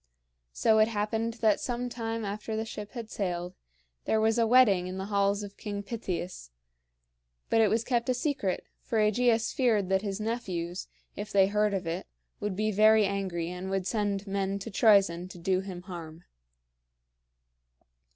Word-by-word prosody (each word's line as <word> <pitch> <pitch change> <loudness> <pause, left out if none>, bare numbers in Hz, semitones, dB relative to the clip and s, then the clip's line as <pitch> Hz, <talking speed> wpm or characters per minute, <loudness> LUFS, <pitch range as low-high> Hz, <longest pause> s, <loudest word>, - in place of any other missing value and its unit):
So 220 - +3
it 215 - +6
happened 225 +1 -1
that 215 -2 +4
some 245 0 -2
time 230 -2 -4
after 210 +2 -4
the 220 +1 -2
ship 210 -2 -7
had 230 -3 -7
sailed, 180 -2 -3 0.5
there 220 - +2
was 220 +2 +2
a 230 - +3
wedding 215 -7 +5
in 185 +1 -5
the 190 - -3
halls 200 +1 +2
of 200 0 -9
King 205 -1 -5
Pittheus; 185 - -5 1.0
but 225 - +5
it 220 - +5
was 225 +2 +1
kept 240 -1 0
a 255 - +2
secret, 245 -8 -1 0.2
for 230 - -2
AEgeus 225 +2 +2
feared 220 -7 +2
that 190 0 +2
his 200 -1 -3
nephews, 190 -6 -3 0.3
if 205 +1 -6
they 195 -1 +5
heard 210 +1 +1
of 185 -2 -3
it, 165 +2 -3 0.3
would 205 -2 -2
be 215 +2 0
very 215 +1 +5
angry 190 -4 -2
and 180 +1 -5
would 195 -1 -1
send 205 -1 -1
men 195 0 -1
to 200 +3 -7
Troezen 195 -5 +4
to 185 - -11
do 185 +2 +1
him 185 -2 -7
harm. 170 -2 -9
205 Hz, 170 wpm, -29 LUFS, 190-225 Hz, 1.0 s, it